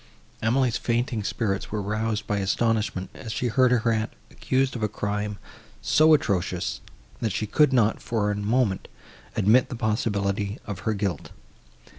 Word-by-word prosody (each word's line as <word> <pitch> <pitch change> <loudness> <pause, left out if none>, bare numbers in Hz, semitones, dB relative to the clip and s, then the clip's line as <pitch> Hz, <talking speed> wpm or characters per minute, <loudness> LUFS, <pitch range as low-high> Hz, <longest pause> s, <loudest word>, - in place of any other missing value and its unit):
Emily's 120 +1 +2
fainting 120 -1 -1
spirits 100 -2 -2
were 105 - -1
roused 105 +1 -2
by 105 - -1
astonishment, 105 -1 0
as 115 -5 -7
she 125 +2 -1
heard 130 +2 +4
her 120 -2 +2
aunt 110 -1 -1 0.2
accused 130 0 0
of 120 - -4
a 105 - +2
crime 105 0 -3 0.4
so 155 0 +5
atrocious, 100 -11 -1 0.4
and 110 - 0
she 110 - -1
could 145 +7 +3
not, 115 -4 +2
for 105 -3 0
a - - -1
moment, 105 0 0 0.5
admit 115 +6 +4
the 125 - -4
possibility 105 -3 -1
of 100 -3 -5
her 110 - +1
guilt. 100 -3 -2
110 Hz, 155 wpm, -25 LUFS, 105-120 Hz, 0.5 s, so